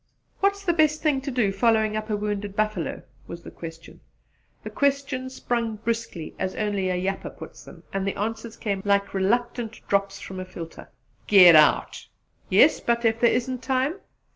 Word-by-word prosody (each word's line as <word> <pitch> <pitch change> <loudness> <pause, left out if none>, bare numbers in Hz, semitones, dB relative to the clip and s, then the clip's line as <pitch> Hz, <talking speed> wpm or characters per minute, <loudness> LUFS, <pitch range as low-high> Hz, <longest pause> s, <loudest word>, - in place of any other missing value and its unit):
"What's 400 0 +1
the 345 - +2
best 310 -1 +2
thing 290 -4 +2
to 275 - -5
do 240 -6 +1
following 220 +1 +2
up 215 +1 -4
a 210 - 0
wounded 205 -1 -3
buffalo?" 215 -5 -2 0.2
was 170 0 -9
the - - -10
question. 165 0 -10 0.6
The - - -7
questions 270 -2 -1
sprung 235 -3 -2
briskly, 225 -7 -4
as 185 0 -2
only 205 -3 -1
a 180 - 0
'yapper' 195 +2 -3
puts - - -12
them; - - -14
and 195 0 -2
the 195 - -2
answers 225 +2 -4
came 200 -3 -2
like 200 0 +1
reluctant 230 +3 -1
drops 200 0 0
from 190 -1 -8
a 185 - -5
filter. 170 -3 -10 0.4
"Git 180 -5 +8
out!" 155 -1 +3 0.4
"Yes, - - +5
but 235 0 0
if 225 0 +2
there 235 - +5
isn't 255 +1 -1
time?" 270 +7 -1
215 Hz, 175 wpm, -25 LUFS, 195-245 Hz, 0.6 s, Git